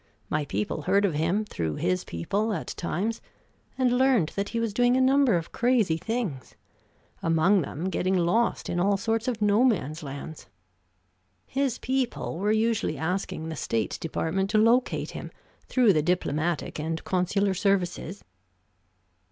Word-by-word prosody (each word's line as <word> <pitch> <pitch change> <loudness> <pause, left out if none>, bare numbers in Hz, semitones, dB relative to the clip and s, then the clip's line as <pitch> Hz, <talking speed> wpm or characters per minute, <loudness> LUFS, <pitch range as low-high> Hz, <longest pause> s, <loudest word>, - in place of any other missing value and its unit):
My 150 -1 0
people 105 +6 -2
heard 200 +5 +2
of 185 - 0
him 170 +8 0
through 80 - -3
his 90 0 0
people 200 - -2
at 170 - -4
times, 200 +7 -2 0.6
and 250 -1 +2
learned 255 -12 +3
that 200 0 -3
he 230 - -2
was 230 -3 -1
doing 245 +3 +3
a - - +3
number 265 -3 +4
of 170 -1 -3
crazy 235 -8 +2
things, 200 - -4 0.7
among 165 +4 +3
them 160 +4 -4
getting 185 +1 +1
lost 180 +7 +1
in 175 - -1
all 200 +2 +2
sorts 225 +3 -1
of 225 -4 -1
No 210 +3 +4
man's 165 - +1
lands. 145 +2 -8 1.0
His 270 -2 -1
people 255 -9 -2
were 205 +2 +1
usually 225 +1 +1
asking 160 -1 -3
the 160 - -4
State 115 -5 -2
Department 175 +4 -1
to 215 - +2
locate 230 +4 +2
him, - - -7 0.4
through 245 -6 +4
the 155 - +2
diplomatic 165 -1 -1
and 160 +1 -3
consular 195 +2 +1
services." 190 -1 -1
195 Hz, 150 wpm, -26 LUFS, 160-230 Hz, 1.0 s, number